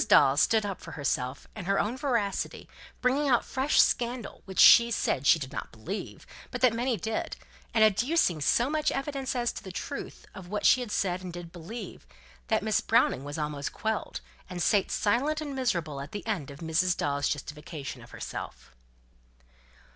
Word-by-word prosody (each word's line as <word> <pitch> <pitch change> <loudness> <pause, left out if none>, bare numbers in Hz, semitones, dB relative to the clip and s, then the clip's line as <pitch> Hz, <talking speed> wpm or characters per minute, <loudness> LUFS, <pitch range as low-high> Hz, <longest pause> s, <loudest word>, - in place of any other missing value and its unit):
Dawes 140 +3 +6
stood 220 -2 +3
up 195 -3 -4
for - - -9
herself 140 -2 -2
and 200 -5 -7
her 200 0 +2
own 220 +4 0
veracity, 235 -8 -2 0.3
bringing 275 +3 +2
out 240 -3 +3
fresh 270 +2 +1
scandal, 240 -2 +1
which 190 -2 -9
she 235 0 +9
said 140 - 0
she - - +7
did 135 -4 -6
not - - -6
believe, 165 - -7 0.2
but - - -5
that 250 -3 +5
many 240 +1 0
did; 220 +4 -3 0.4
and 220 - +4
adducing 215 - +3
so 240 - +3
much 305 +1 +1
evidence 275 -1 -3
as 240 -1 0
to - - -8
the 190 - -7
truth 180 - -6
of 190 -3 -10
what 210 +3 -3
she 255 - +6
had 245 - -5
said 185 -3 0
and 180 -2 -7
did 175 -1 -8
believe, 180 - -8 0.4
that - - +1
Miss - - +1
Browning 130 - +2
was 145 +2 -6
almost 150 -2 -3
quelled, 220 0 -3 0.3
and 180 -2 -5
sate 195 +3 +2
silent 270 +9 +1
and 295 -3 -5
miserable 170 - -1
at 140 - -9
the 205 - -5
end 195 -11 -2
of 140 +2 -11
Mrs. 165 +2 +1
Dawes' 145 0 0
justification 150 0 -6
of - - -14
herself. - - -7
200 Hz, 185 wpm, -28 LUFS, 155-240 Hz, 0.4 s, she